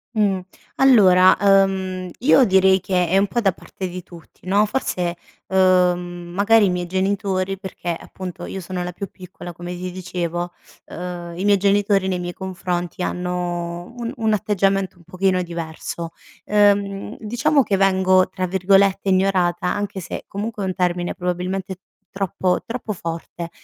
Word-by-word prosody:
Mh, 200 -3 +2 0.4
allora, 190 -9 +6
uhm, 190 -2 +2
io 265 +1 +5
direi 190 -2 +4
che 180 -3 +1
è 190 +3 +2
un 200 +1 +3
po' 240 - -1
da 195 -5 +2
parte 190 - -7
di 180 0 -7
tutti 170 -3 -16
no, 200 +3 +3
forse, 180 -7 -2 0.3
uhm, 180 -2 +2
magari 210 +1 +5
i - - +2
miei 180 -1 -1
genitori 190 +1 -1
perché 180 -3 -5
appunto 180 -1 -8
io 190 - -5
sono 180 0 -4
la 180 - -4
più 195 +3 -6
piccola, 180 -1 -10
come 175 +1 -7
ti 180 +1 -5
dicevo, 175 -1 -4 0.4
uhm, 175 -1 -6
i 190 - -2
miei 205 -1 +5
genitori 200 0 +2
nei 180 - -1
miei 175 0 -4
confronti 180 -2 -4
hanno 175 +1 -3
un 235 -1 -4
un 220 -1 +1
atteggiamento 195 -1 0
un 170 - -19
pochino 185 +1 +1
diverso. 170 0 -5 0.4
Ehm, 205 0 +2
diciamo 265 +6 +2
che 200 -2 0
vengo 185 -1 +4
tra 185 -1 -3
virgolette 195 +2 +3
"ignorata" 185 -2 +2
anche 205 -2 -4
se, 175 - -6
comunque 210 +1 -4
è - - -1
un 185 - -2
termine 175 -1 0
probabilmente 185 +1 -3 0.3
troppo 190 -2 -1
troppo 230 -2 -5
forte, 170 0 -6
185 Hz, 155 wpm, -21 LUFS, 180-195 Hz, 0.4 s, allora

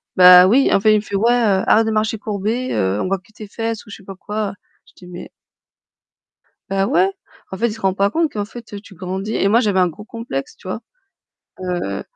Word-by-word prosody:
Bah, 180 0 +9
oui, 250 +8 +4
en - - +4
fait, 215 +2 +4
il - - +4
me - - -1
fait: 205 -1 -6
«Ouais, 225 +5 +3
heu, 210 -6 +2
arrête 225 +1 +4
de - - 0
marcher 215 0 -1
courbée, 215 +4 -3
heu, 95 0 0
on - - -2
voit 195 +1 0
que 190 +3 -23
tes 210 0 -10
fesses 225 +1 -4
ou - - -13
je - - -8
sais - - -18
pas 195 0 -9
quoi». 205 +1 -4 0.3
Je - - -23
dis: 180 - -15
«Mais» 180 0 -9 1.4
Bah 195 0 0
ouais, 185 +1 +3 0.4
en 190 - -5
fait, 235 - +1
il 220 - -4
se 220 - -12
rend 190 -1 +1
pas 200 +1 +1
compte 320 +6 0
qu'en 205 -4 -3
fait, 225 0 -12
heu, 205 - -5
tu 200 -1 -16
grandis 190 +4 -4
et - - +1
moi, 225 +3 +4
j'avais 205 -6 +1
un 180 - +4
gros 210 +6 -12
complexe, 230 - -6
tu 190 - -13
vois? 185 - -3 0.8
Heu, 175 - -3
200 Hz, 245 wpm, -19 LUFS, 185-220 Hz, 1.4 s, Bah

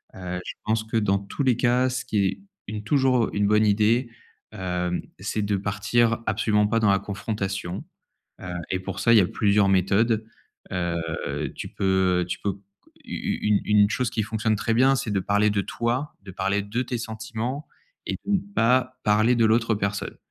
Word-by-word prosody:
Heu, 90 -1 -5
je - - -5
pense 110 0 +1
que 115 +1 -2
dans 100 -2 +2
tous 100 +8 -6
les 125 -3 +3
cas 125 +1 +2
ce 125 0 -3
qui 100 -2 +1
est 95 - -2 0.3
une 105 0 -5
toujours 130 -1 +2
une 100 0 +1
bonne 105 +1 +4
idée, 110 +4 +2 0.4
heu, 90 -1 -2 0.2
c'est 105 +2 -2
de 100 -1 0
partir 105 +4 +1
absolument 105 -1 +2
pas 115 +2 +1
dans 105 -3 +4
la 100 - +3
confrontation, 100 -2 -4 0.6
heu, - - -8 0.2
et 95 - 0
pour 95 +1 -6
ça, 115 +3 +4
il 115 - +8
y - - +7
a 90 - +3
plusieurs 100 0 +2
méthodes. 105 +4 +2 0.5
Heu, 85 -3 -3
tu - - -6
peux 95 -2 +1
tu - - -3
peux 100 - 0
c 95 - -12 0.5
u - - -3
u - - 0
une 105 -2 +3
une 105 -1 +4
chose 125 -1 0
qui 110 - -1
fonctionne 110 0 0
très 110 +2 0
bien 130 +3 +5
c'est 130 -5 -3
de 100 - +1
parler 105 +2 +2
de 100 -1 +1
toi, 120 +8 -2
de 95 - -10
parler 95 +2 -1
de 110 +5 -2
tes 125 -1 -3
sentiments 115 +5 -4 0.4
et - - -2
de 205 - -1
ne - - +4 0.2
pas 130 -1 +2
parler 110 +3 +4
de 115 - +3
l'autre 115 0 +3
personne. 100 -1 -3
105 Hz, 200 wpm, -25 LUFS, 100-115 Hz, 0.6 s, il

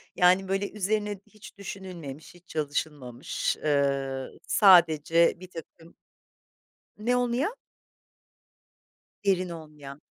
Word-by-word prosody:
yani, 185 +2 +4
böyle, 195 +1 -1
üzerine 210 0 -1
hiç 210 -2 -15
düşünülmemiş, 180 -7 -8
hiç 175 0 -20
çalışılmamış, 145 -4 -3
ııı, 140 -2 0
sadece 170 -4 +5
birtakım 170 -2 -12 1.0
Ne 235 +4 +1
olmayan? 250 - 0 1.7
Derin 185 -2 +2
olmayan. 150 -3 -10
175 Hz, 85 wpm, -27 LUFS, 150-195 Hz, 1.7 s, sadece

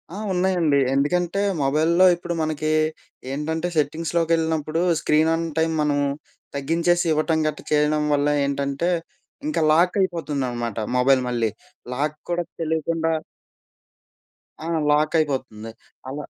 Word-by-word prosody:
ఆ! - - -6 0.2
ఉన్నాయండి. 180 -5 +2 0.2
ఎందుకంటే, 175 +7 +1 0.2
మొబైల్‌లో 160 +6 +3
ఇప్పుడు 175 0 -5
మనకి, 155 0 -1 0.6
ఏంటంటే 160 +4 -2
సెట్టింగ్స్‌లోకి 165 +3 0
యెళ్ళినప్పుడు 160 0 -1 0.2
స్క్రీన్ 155 +1 +3
ఆన్ 165 +1 -1
టైమ్ 160 0 +2
మనం 145 -1 +1 0.6
తగ్గించేసి 170 +5 +1
ఇవ్వటం 160 +1 +1
గట్ట 150 -1 -3
చేయడం 150 0 +2
వల్ల 145 0 +2 0.2
ఏంటంటే, 140 +4 -1 0.6
ఇంకా 305 - 0
లాక్ 170 +3 +4
అయిపోతుందనమాట 135 - -2 0.2
మొబైల్ 130 +1 +4
మళ్ళీ. 115 -2 0 0.5
లాక్ 150 +3 -1
కూడా 175 0 0 0.2
తెలియకుండా 160 +1 0 1.5
ఆ! - - -4 0.2
లాక్ 150 +1 +2
అయిపోతుంది. 130 -7 -3 0.4
అలా 145 +2 -5
155 Hz, 115 wpm, -23 LUFS, 140-165 Hz, 1.5 s, లాక్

